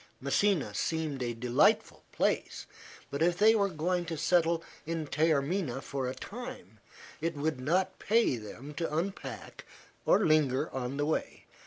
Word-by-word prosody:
Messina 140 - +1
seemed 155 +3 -2
a 120 -1 -2
delightful 120 +1 +2
place, - - -1 0.5
but 140 - -3
if 175 +1 +3
they 215 +3 +6
were 200 -3 +2
going 175 +2 -1
to 165 -2 -4
settle 165 +1 +2 0.2
in 165 0 -3
Taormina 150 -1 +1
for 135 -1 -3
a 130 - -5
time 130 - -8 0.4
it 165 0 -1
would 145 -1 -1
not 185 +7 0
pay 225 - +3
them 120 +6 -9
to 165 +1 -3
unpack 190 +4 -5 0.4
or 205 - +5
linger 150 -4 +2
on 130 +1 -3
the 145 - +1
way. 155 - -2
155 Hz, 150 wpm, -30 LUFS, 135-175 Hz, 0.5 s, they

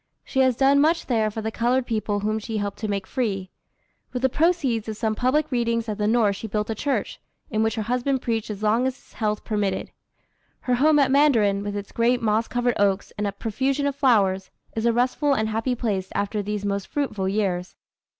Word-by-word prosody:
She 265 - -2
has 260 -2 +4
done 275 +2 +4
much 325 +3 +2
there 220 -4 +1
for 220 +1 -5
the 220 - -2
colored 245 +3 +1
people 215 -3 -1
whom 215 +1 0
she 220 0 -4
helped 205 -1 -3
to 215 - -2
make 200 -2 -2
free. 195 -7 -2 0.6
With 250 0 -4
the 265 - +4
proceeds 275 -8 +1
of 215 - -5
some 220 -1 0
public 280 +7 +1
readings 235 -2 0
at 215 -1 -4
the 210 - +1
North 220 -3 +3
she 220 - -6
built 210 +1 -2
a - - 0
church, 275 +6 -2 0.3
in 215 -1 +1
which 220 0 +1
her 220 - -2
husband 250 +4 0
preached 225 -2 -1
as 210 0 -6
long 225 +4 +3
as 260 - -2
his - - -23
health 210 -2 -2
permitted. 205 -3 -2 0.7
Her 250 - 0
home 295 +5 +4
at 275 -2 +3
Mandarin, 230 -9 +4
with 205 0 -4
its 200 0 -7
great 240 +2 +2
moss 220 0 +1
covered 245 -1 0
oaks 200 -1 +1
and 205 -1 -1
profusion 265 +7 -1
of 280 -1 0
flowers, 200 -9 +2 0.3
is 225 +1 0
a - - +5
restful 255 +4 +1
and 220 -2 0
happy 225 +4 -1
place 200 -6 -2
after 205 +1 -1
these 205 0 -3
most 200 -1 -2
fruitful 215 -10 -2
years. 190 -3 -1
225 Hz, 215 wpm, -24 LUFS, 205-255 Hz, 0.7 s, a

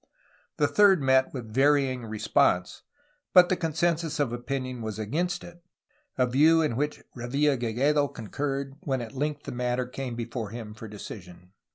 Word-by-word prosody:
The - - +3
third 200 -3 +5
met 130 -1 +3
with 115 -5 -7
varying 135 -2 +2
response, 105 -4 +1 0.5
but 180 -1 +8
the 185 - +3
consensus 165 -1 -1
of 135 -5 0
opinion 130 0 -4
was 110 -2 -4
against 175 +12 -2
it, 175 0 -13 0.5
a 130 - +4
view 155 +6 +4
in 150 -7 0
which 150 +4 -2
Revilla 135 +4 +1
Gigedo 135 +5 +1
con 115 -5 -10
curred 140 -1 -3
when 135 -3 -2
at 115 - -7
length 145 +2 -2
the - - -6
matter 125 0 -1
came 125 -1 -5
before 115 -2 -4
him 110 -1 -7
for 110 +1 -9
decision. 90 -3 -10
130 Hz, 165 wpm, -27 LUFS, 115-150 Hz, 0.5 s, but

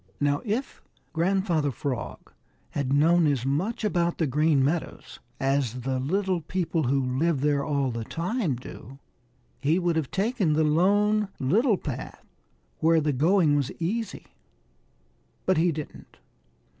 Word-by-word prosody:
Now 145 0 +1
if 235 +6 -3 0.3
Grandfather 170 -3 +1
Frog 130 0 -5 0.4
had 135 -2 -2
known 160 +4 +4
as 135 -4 0
much 175 +13 -1
about 175 -5 0
the 165 - +1
Green 150 0 +2
Meadows 160 +4 -3 0.2
as 135 -3 0
the 130 +1 -1
little 185 +5 0
people 165 -1 -1
who 130 0 0
live 165 -3 +1
there 145 -1 +1
all 140 -3 0
the 115 -1 -4
time 170 - -2
do, 125 +1 -10 0.6
he 150 +4 +2
would 175 -2 +1
have 155 -5 -1
taken 200 -5 0
the 155 +1 +2
Lone 205 +7 +3
Little 210 - +2
Path, 130 -7 -7 0.5
where 165 +1 +4
the 150 -1 0
going 160 +2 +3
was 140 -3 0
easy. 215 +7 -3 1.2
But 185 - +2
he 170 +2 +3
didn't. 155 -1 -8
155 Hz, 140 wpm, -26 LUFS, 140-185 Hz, 1.2 s, known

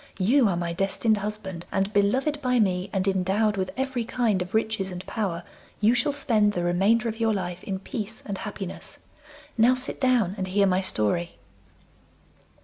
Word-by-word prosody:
You 235 +6 +4
are 175 - 0
my 170 -1 -2
destined 195 +4 +1
husband, 200 -4 -5
and, 195 +1 0
beloved 265 +9 +1
by 250 -2 +2
me, 185 -3 +1
and 190 -1 -1
endowed 195 +3 +1
with 190 -1 -2
every 265 -2 -1
kind 225 -5 0
of 180 +3 -4
riches 220 -3 0
and 180 +1 -7
power, 185 -6 -3 0.4
you 215 +3 +4
shall 250 +4 +1
spend 220 -7 +2
the 175 - -1
remainder 195 +7 +2
of 225 0 -4
your 225 -2 +2
life 180 -2 -4
in 195 - -3
peace 220 +1 -6
and 200 -2 -4
happiness. 200 -3 -7 0.5
Now 245 +3 +6
sit 255 +2 -3
down 245 -8 +3
and 185 - -1
hear 200 +2 +3
my 185 -1 +2
story. 170 - 0
205 Hz, 175 wpm, -26 LUFS, 185-230 Hz, 0.5 s, Now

